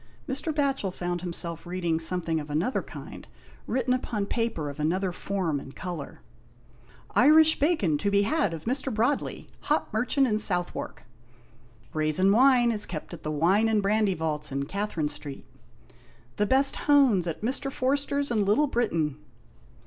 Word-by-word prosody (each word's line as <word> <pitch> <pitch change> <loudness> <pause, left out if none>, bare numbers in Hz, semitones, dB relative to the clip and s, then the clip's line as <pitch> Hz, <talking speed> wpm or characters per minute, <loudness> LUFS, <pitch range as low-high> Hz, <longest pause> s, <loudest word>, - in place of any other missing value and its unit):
Mr, 290 +4 -2
Batohel 275 -8 0
found 175 -1 -3
him 175 -1 -4
self 170 0 -3
reading 175 -2 -1
something 165 -1 0
of 150 0 -8
another 165 - 0
kind, - - -10 0.4
written 255 0 0
upon 225 -5 -2
paper 230 -9 -2
of 140 +1 -7
another 180 +5 0
form 180 -5 -2
and 135 - -11
colour. 175 -6 -7 0.5
" - - -26
Irish 315 +2 +6
bacon 245 - +1
to 200 - 0
be 200 0 +3
had 295 - +1
of 160 -2 -7
Mr. 265 +2 -1
Broadley, 235 +6 -1
hop 300 -5 -1
merchant 250 +5 +2
in 215 -4 0
Southwark." 175 -4 -2 0.9
"Rasin 155 +5 +3
wine 245 +1 +5
is 215 -2 -2
kept 155 -4 -7
at - - -9
the 155 - -4
Wine 175 +9 +2
and 215 -2 +1
Brandy 205 -1 +2
vaults 155 -2 -2
in 140 +1 -2
Catherine 195 -3 -2
Street." 145 -2 -8 0.5
" 120 +1 -29
The 210 - +1
best 270 +3 +3
hones 265 -12 +4
at 165 +4 -5
Mr. 270 +3 -1
Forsters 280 +1 -1
in 215 -3 +2
Little 210 +9 +3
Britain." 165 - -1
200 Hz, 165 wpm, -27 LUFS, 165-255 Hz, 0.9 s, Irish